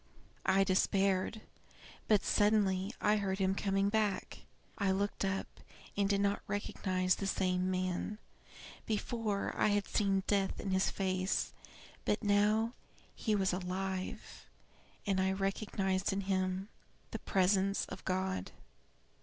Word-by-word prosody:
I 195 +1 +5
despaired; 195 +2 +1 0.7
but 210 -3 +4
suddenly 205 -2 +2
I 210 +1 +3
heard 195 -2 -1
him 190 -1 +2
coming 195 0 +1
back. 210 -2 0 0.4
I 200 -2 +2
looked 200 +2 0
up, 195 0 0 0.5
and 200 -1 +1
did 200 -1 +2
not 200 0 +1
recognize 185 -2 0
the 195 - -2
same 185 -1 +1
man; 185 +3 -1 0.7
before, 215 -1 -1
I - - +3
had 205 -1 +1
seen 195 -2 +1
death 200 -2 +1
in 195 - -3
his 190 0 +2
face; 185 -1 -1 0.5
but 210 - 0
now 210 +3 +3 0.4
he 215 -2 0
was 190 -2 +1
alive, 185 +1 -4 0.6
and 195 -2 +1
I 190 0 +2
recognized 195 -1 0
in 195 +1 -1
him 190 0 -1 0.4
the - - -4
presence 195 +1 +2
of 190 - -9
God. 185 - -1
195 Hz, 130 wpm, -34 LUFS, 190-205 Hz, 0.7 s, I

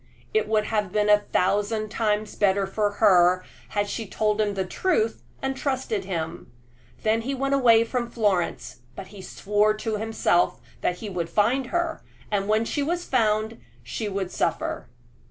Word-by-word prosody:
It 435 - +2
would 215 -1 +2
have 210 -3 -1
been 210 +1 +2
a 210 - +7
thousand 205 +2 0
times 215 -1 -1
better 200 -1 +2
for 205 +1 -1
her 185 -3 +4 0.2
had 205 -1 -1
she 220 +1 -4
told 215 +2 0
him 205 -1 0
the 190 -1 -1
truth 225 - 0 0.2
and 270 0 -1
trusted 260 -7 -2
him. 165 -4 -4 0.5
Then 220 +1 +2
he 270 +4 -3
went 275 +1 -1
away 235 -4 +5
from 235 0 -2
Florence, 205 -7 -1 0.2
but 195 -1 -8
he 200 -2 -11
swore 210 +3 +1
to 215 0 -3
himself 220 -5 +1 0.2
that 180 - 0
he 210 +3 -7
would 170 -2 -3
find 235 +8 +2
her, 345 +3 -1 0.3
and 200 -1 0
when 215 +2 +2
she 290 - -2
was 345 +4 -1
found 220 -2 +1 0.2
she 220 - -4
should 195 -2 -3
suffer. - - -2
215 Hz, 170 wpm, -25 LUFS, 200-230 Hz, 0.5 s, a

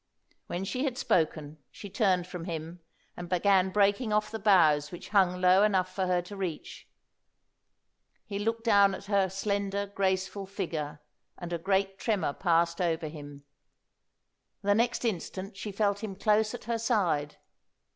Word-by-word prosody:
When 180 - -3
she 255 +7 -2
had 260 -4 -2
spoken 155 - 0
she 205 - -10
turned 185 -3 +1
from 180 -2 -7
him 165 0 -6 0.4
and 175 0 -8
began 190 +1 +3
breaking 205 +4 +2
off 210 0 +1
the 220 - -4
boughs 160 -8 +4
which 175 - -9
hung 185 -3 +3
low 185 +1 +5
enough 190 -3 +2
for 190 -1 -1
her 180 -1 +1
to 200 +4 -9
reach. 185 -5 -6 1.4
He 200 -1 -5
looked 225 +2 -2
down 200 -4 +4
at 195 - -10
her 200 -2 +2
slender, 200 +1 -2
graceful 195 0 -2
figure, 165 -7 -4 0.4
and 175 -1 -6
a 170 - -2
great 195 +2 0
tremor 205 -10 0
passed 170 0 +1
over 165 -2 -1
him. 145 -2 -11 1.2
The 205 +1 +3
next 240 +3 0
instant 195 -1 -3
she 205 +2 -6
felt 200 +1 0
him 200 -3 -4
close 215 +2 +2
at - - -10
her 230 +1 -2
side. 175 - 0
190 Hz, 155 wpm, -29 LUFS, 175-205 Hz, 1.4 s, low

